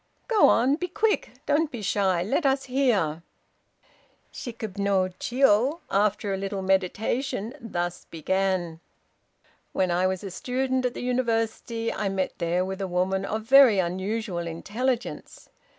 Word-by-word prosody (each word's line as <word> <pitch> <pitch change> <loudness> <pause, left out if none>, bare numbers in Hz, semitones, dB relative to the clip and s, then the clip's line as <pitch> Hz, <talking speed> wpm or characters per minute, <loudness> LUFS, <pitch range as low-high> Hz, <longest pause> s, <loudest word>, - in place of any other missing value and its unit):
"Go 445 -4 +5
on; 260 +5 +3
be 360 - -3
quick; 425 +5 0 0.2
don't 295 +2 +2
be 235 -6 -7
shy; 190 -3 +1
let 265 - 0
us 270 -1 +2
hear!" 225 - +1 1.1
Shikib 220 -5 -7
no 195 -2 +2
Jiô, 260 +5 +2
after 205 0 +1
a - - -1
little 195 0 -4
meditation, 200 +5 -1
thus 175 -5 -4
began: 175 0 -1 0.9
"When 185 -2 +1
I 180 +2 +2
was 190 0 -3
a 195 - -6
student 260 +5 -1
at 245 - -7
the - - -5
University, 230 -2 -1
I 205 -2 -1
met 190 -1 -1
there 175 +1 0
with 190 +1 -5
a 195 - -1
woman 185 +2 0
of 220 +2 -3
very 255 -2 +7
unusual 185 0 -2
intelligence. 235 +9 -3
205 Hz, 140 wpm, -26 LUFS, 185-250 Hz, 1.1 s, very